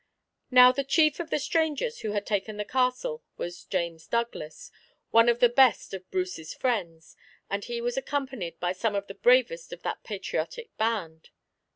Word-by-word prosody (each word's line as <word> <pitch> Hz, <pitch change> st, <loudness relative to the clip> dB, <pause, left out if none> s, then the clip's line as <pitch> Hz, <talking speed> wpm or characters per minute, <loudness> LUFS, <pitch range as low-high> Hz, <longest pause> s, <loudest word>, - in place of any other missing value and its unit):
Now, 250 Hz, 0 st, +8 dB
the 275 Hz, +2 st, -2 dB
chief 305 Hz, +3 st, +3 dB
of 340 Hz, -2 st, -4 dB
the -, -, +1 dB
strangers 320 Hz, -, -1 dB
who 215 Hz, -2 st, -3 dB
had 205 Hz, -1 st, -2 dB
taken 205 Hz, +1 st, -2 dB
the 210 Hz, -, -3 dB
castle 260 Hz, -, 0 dB
was 175 Hz, 0 st, -6 dB
James 170 Hz, -3 st, -3 dB
Douglas, 235 Hz, -10 st, -3 dB, 0.4 s
one 230 Hz, +1 st, +6 dB
of 235 Hz, 0 st, +2 dB
the 245 Hz, -, +7 dB
best 245 Hz, -3 st, +3 dB
of 185 Hz, -1 st, -7 dB
Bruce's 180 Hz, -3 st, -3 dB
friends, 175 Hz, -10 st, -2 dB, 0.4 s
and 200 Hz, 0 st, -1 dB
he 235 Hz, -1 st, -4 dB
was 240 Hz, +1 st, -2 dB
accompanied 260 Hz, -, -3 dB
by 175 Hz, 0 st, 0 dB
some 205 Hz, +3 st, -1 dB
of 200 Hz, 0 st, -1 dB
the 195 Hz, -, -9 dB
bravest 255 Hz, -, +3 dB
of -, -, -9 dB
that -, -, -4 dB
patriotic 475 Hz, -2 st, -4 dB
band. 195 Hz, -8 st, -2 dB
235 Hz, 175 wpm, -27 LUFS, 185-265 Hz, 0.4 s, Now